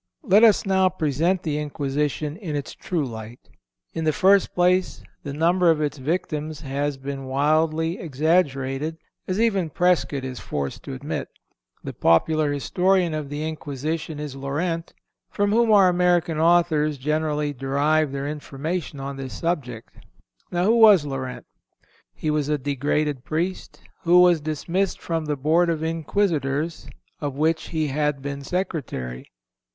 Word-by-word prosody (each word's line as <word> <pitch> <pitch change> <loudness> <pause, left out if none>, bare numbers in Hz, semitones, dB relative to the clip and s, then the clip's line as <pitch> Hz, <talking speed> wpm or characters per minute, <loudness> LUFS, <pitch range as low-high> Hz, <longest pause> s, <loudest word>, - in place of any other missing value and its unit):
Let 205 +4 +5
us 220 -2 +5
now 190 -1 +3
present 170 +2 0
the 150 -2 -1
Inquisition 150 0 -2
in 175 -8 -5
its 145 - -4
true 165 -6 -2
light. 115 0 -9 0.4
In 165 - -3
the 155 - +3
first 190 +5 +3
place, 180 +1 +2 0.2
the 145 - -6
number 170 +4 +3
of 160 -2 +3
its 150 -1 -2
victims 155 0 -3
has 140 0 -2
been 135 0 -6
wildly 155 +5 +1
exaggerated, 150 -1 0 0.3
as 185 +2 -1
even 200 -7 +1
Prescott 170 -4 +1
is 130 -2 -6
forced 70 -2 -4
to - - -5
admit. - - -4 0.6
The - - -6
popular 150 - +2
historian 180 +5 +1
of 150 -2 -4
the 150 +2 -3
Inquisition 155 +1 -4
is 150 -3 -5
Llorente, 165 +5 -3 0.3
from 205 0 0
whom 230 +1 +3
our 195 -3 +6
American 175 -3 +2
authors 160 -3 +3
generally 150 +1 -1
derive 140 +3 +1
their 140 0 -3
information 150 +1 -4
on 135 0 -5
this 130 -4 -6
subject. 130 -10 -3 0.6
Now 175 0 +1
who 225 +3 +4
was 205 -8 +7
Llorente? 130 -2 -5 0.7
He 155 - -2
was 150 -1 0
a 150 - +2
degraded 145 0 -1
Priest, 170 +7 -3 0.2
who 175 +1 +5
was 175 -3 +5
dismissed 165 +5 -2
from 165 -2 -2
the 150 -1 -2
Board 160 +5 +2
of 160 -1 -1
Inquisitors, 160 -2 -1 0.3
of 145 -3 -3
which 160 +2 +1
he 155 -3 -1
had 150 -1 -1
been 140 0 -4
Secretary. 140 - -4
155 Hz, 145 wpm, -23 LUFS, 140-175 Hz, 0.7 s, was